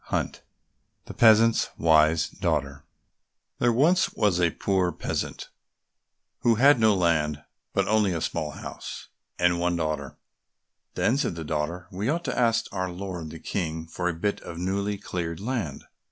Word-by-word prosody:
94 - - -2 0.6
The - - -8
Peasant's 115 0 +5
Wise 80 0 +4
Daughter 70 +1 -2 0.7
There 120 - +3
was 155 +10 +3
once 100 -5 +2
a 85 -1 +4
poor 95 +1 0
peasant - - -4 0.9
who 115 -1 +3
had 135 +3 +5
no 110 -2 +4
land, 75 -4 +1 0.3
but - - 0
only 105 -2 +3
a 85 - -1
small 75 -1 -2
house, - - -8 0.3
and 90 -1 +2
one 90 0 +1
daughter. 75 -4 -3 0.8
Then 125 - +2
said 135 - -1
the 85 - -5
daughter, 80 +3 -3
"We 100 +6 -2
ought 170 +3 0
to - - -3
ask 115 -2 +2
our 95 -2 -2
lord 90 -3 -6
the 80 - -8
King 80 -2 -3
for 90 +2 -2
a - - -1
bit 100 +3 -1
of 85 - -8
newly 100 +3 -1
cleared 85 -4 -4
land." 105 - -3
90 Hz, 155 wpm, -26 LUFS, 80-110 Hz, 0.9 s, Peasant's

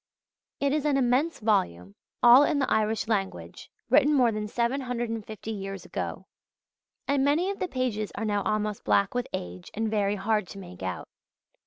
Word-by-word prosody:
It 280 0 +1
is 300 -2 0
an 290 -2 +2
immense 265 +6 +1
volume, 90 - 0 0.3
all 245 +3 +9
in 290 - +1
the 275 - 0
Irish 215 0 +1
language, 200 -4 -3 0.2
written 295 +1 +4
more 245 -4 +4
than 210 -1 -3
750 235 -3 -3
years 195 -3 -6
ago; - - -5 0.8
and 275 -1 +2
many 315 +7 +2
of 400 - -7
the 370 - -1
pages 245 - -2
are 220 - -3
now 205 -1 0
almost 210 0 -2
black 200 -1 +2
with 245 0 -2
age 90 0 -6
and 220 0 -1
very 205 -1 +1
hard 210 0 0
to 195 - -10
make 185 -1 -11
out. 95 -1 -4
220 Hz, 170 wpm, -27 LUFS, 200-260 Hz, 0.8 s, all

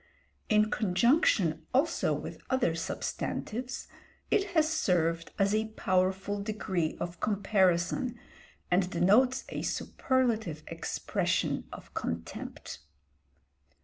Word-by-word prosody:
In 215 0 +4
conjunction 190 - +2
also 290 +5 +2
with - - -4
other 260 -10 +2
substantives, 225 +8 -4 0.4
it 395 - +3
has 310 -1 +5
served 170 - +1
as 200 0 +2
a 220 +1 +2
powerful 190 +2 +1
degree 190 -6 -2
of 175 -1 -5
comparison 200 +3 +1 0.5
and 180 0 +3
denotes 235 +10 +4
a - - -4
superlative 225 - 0
expression - - -1
of - - -11
contempt. 85 0 -5
200 Hz, 95 wpm, -30 LUFS, 175-240 Hz, 0.5 s, has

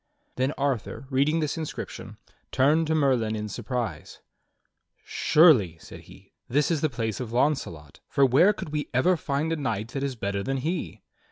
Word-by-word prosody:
Then 130 +2 0
Arthur, 135 -3 -2
reading 145 +5 +2
this 155 +2 -2
inscription, 155 - -7 0.3
turned 155 +5 +3
to 160 - +1
Merlin 125 -7 +1
in 105 0 -4
surprise. 110 -4 -5 0.9
"Surely," 130 - +4
said - - -12
he, - - -17 0.2
"this 145 +5 +1
is 160 -3 0
the 155 - +2
place 115 -4 -3
of 120 -3 -5
Launcelot, 120 - -1
for 140 - +3
where 135 - +5
could 205 - -7
we 150 -1 -3
ever 180 +9 +4
find 155 0 -2
a - - -2
knight 115 -6 -3
that 135 +3 -4
is 140 -2 -2
better 100 -3 -3
than 135 +6 -2
he. 165 +6 -4
135 Hz, 170 wpm, -26 LUFS, 115-150 Hz, 0.9 s, where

